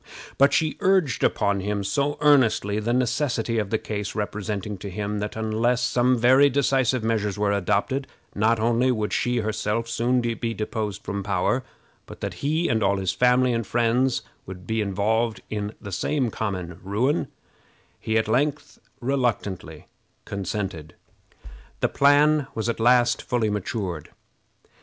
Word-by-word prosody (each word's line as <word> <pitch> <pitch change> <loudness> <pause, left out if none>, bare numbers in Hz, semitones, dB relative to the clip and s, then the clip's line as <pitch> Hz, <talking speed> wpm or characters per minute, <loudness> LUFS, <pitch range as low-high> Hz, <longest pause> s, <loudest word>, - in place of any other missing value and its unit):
But 140 +1 +6
she 155 +2 +1
urged 185 -9 +2
upon 100 -1 +1
him 100 +1 -2
so 140 +9 0
earnestly 120 -8 +3
the 110 +2 -1
necessity 120 -2 0
of 105 -2 -2
the 110 - +1
case, 105 -2 -5
representing 105 -1 -3
to 100 - -6
him 105 +2 -3
that 105 0 -4
unless 110 +3 0
some 125 +1 +2
very 130 +4 +5
decisive 130 -3 +1
measures 105 -3 -1
were 105 0 +1
adopted, 100 +7 0 0.3
not 110 +2 +2
only 120 +3 +2
would 110 -3 -2
she 120 -1 +1
herself 110 +1 -2
soon 120 +2 +1
be 115 -1 -2
deposed 105 -2 -4
from 100 0 -3
power, 100 +6 0 0.4
but - - -11
that - - -3
he 155 +4 +1
and 110 -1 +1
all 100 0 +2
his 95 -2 0
family 125 +5 +3
and 115 -3 -2
friends 120 +2 +1 0.2
would 90 -1 -9
be 110 0 -1
involved 110 +3 0
in 105 0 -3
the 100 - -8
same 125 +6 -1
common 90 -6 -4
ruin, 115 - 0 0.7
he 110 0 0
at 110 -1 +1
length 145 +6 -1 0.2
reluctantly 110 - -2 0.4
consented. 95 -5 -4 0.8
The - - +1
plan 145 +1 +4
was 110 0 -2
at 115 - -2
last 120 +1 +4
fully 115 -4 0
matured. 95 -5 -4
110 Hz, 150 wpm, -24 LUFS, 100-125 Hz, 0.8 s, But